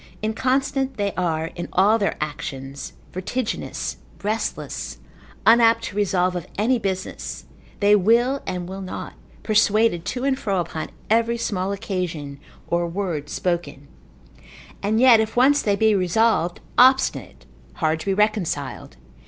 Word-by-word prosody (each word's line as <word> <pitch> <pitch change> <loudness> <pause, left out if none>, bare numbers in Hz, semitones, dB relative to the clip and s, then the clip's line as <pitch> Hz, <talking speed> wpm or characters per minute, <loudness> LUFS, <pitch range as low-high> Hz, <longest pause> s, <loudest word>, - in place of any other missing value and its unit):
_] - - -22 0.2
Inconstant 265 +4 0
they 200 -1 -1
are 165 -3 -1
in 175 - -5
all 210 +5 +4
their 200 - 0
actions, 140 -3 -5 0.2
vertiginous, 220 +6 -3 0.3
restless, 215 +2 -3 0.5
unapt 230 0 +6
to 200 - -6
resolve 185 -3 +1
of 175 - -4
any 235 +4 +2
business, 190 -3 -4 0.4
they 205 +1 +6
will 235 +7 +3
and 180 -1 -3
will 190 +1 -6
not, 185 - -6 0.3
persuaded 215 -4 +3
to 245 +4 -3
and 270 -1 +1
fro 195 -4 0
upon 160 -2 -4 0.2
every 230 +1 +3
small 195 -4 -2
occasion, 170 -8 -4 0.3
or 170 0 0
word 170 -5 -3
spoken: 155 -7 -3 0.9
and 215 +2 +1
yet 245 -3 +7
if 220 0 -1
once 280 +4 +5
they 205 -2 +1
be 220 +1 +3
resolved, 185 -1 +1 0.2
obstinate, 260 +2 +3 0.3
hard 160 -2 0
to 160 - -8
be 195 - +2
reconciled. 195 - -1
200 Hz, 135 wpm, -23 LUFS, 175-225 Hz, 0.9 s, yet